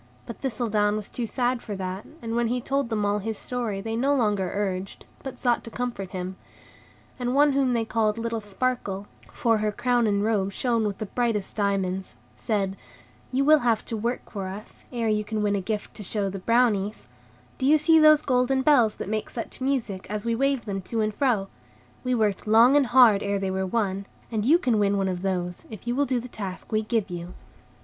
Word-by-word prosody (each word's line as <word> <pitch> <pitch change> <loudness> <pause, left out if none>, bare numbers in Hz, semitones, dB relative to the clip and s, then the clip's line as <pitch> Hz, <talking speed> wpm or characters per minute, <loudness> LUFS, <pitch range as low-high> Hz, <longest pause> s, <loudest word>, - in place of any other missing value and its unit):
But 235 - -8
Thistledown 215 -5 0
was 215 -2 -5
too 240 -2 -3
sad 245 +1 0
for 210 - -5
that, 190 +1 -5 0.2
and 230 0 -3
when 235 0 +2
he 245 +2 0
told 275 0 -1
them 215 -2 0
all 205 +1 +1
his 220 +1 -3
story 235 -6 -3
they 225 +2 -3
no 275 +5 +2
longer 205 -7 +1
urged, 195 -2 -3 0.2
but 265 -2 -7
sought 245 -2 +1
to - - -7
comfort 235 -6 -4
him; 185 0 -5 0.8
and 245 +1 -1
one 290 +1 +5
whom 270 -2 +2
they 230 -1 0
called 220 -1 +1
little 230 -1 -2
Sparkle 205 -2 -2 0.3
(for 225 -3 +1
her 210 0 0
crown 240 +1 +1
and 200 -1 +1
robe 200 -3 0
shone 230 -2 +1
with 200 - -4
the 215 - -4
brightest 220 -2 -1
diamonds), 195 -2 -1 0.2
said: 195 -4 -1 0.5
"You 270 +2 +1
will 305 +1 +7
have 230 -4 +1
to 230 - -4
work 235 +3 -3
for 195 -3 -4
us, 200 +3 -9
ere 235 -2 -1
you 210 -1 +1
can 215 0 -2
win 205 -1 +2
a 200 - -1
gift 210 +2 -4
to - - -8
show 200 0 -2
the 195 - -5
Brownies; 220 -2 +1 0.5
do 265 - +1
you 305 +2 +6
see 320 +2 +5
those 305 -1 +6
golden 260 0 +2
bells 245 -8 +4
that - - -6
make 215 +1 -2
such 235 - -6
music, 250 -8 -1
as 210 +1 -3
we 230 - +1
wave 275 +1 +1
them 195 -2 -3
to 225 +4 -2
and 215 0 0
fro? 220 -5 +1 0.6
We 255 0 +1
worked 215 -3 0
long 230 +5 +6
and 285 -3 +4
hard 240 -5 +6
ere 200 0 0
they 195 -1 -2
were 190 0 -1
won, 195 -2 -1 0.2
and 215 -2 -1
you 310 +7 +6
can 245 -10 +1
win 200 -1 +2
one 195 -1 +1
of 180 -1 -3
those, 180 -2 -3
if 215 -2 -10
you 240 - 0
will 280 +2 +1
do 255 -2 +1
the 245 - -7
task 200 -5 -7
we 215 0 +2
give 215 -3 -1
you." 175 0 -6
220 Hz, 220 wpm, -25 LUFS, 200-245 Hz, 0.8 s, will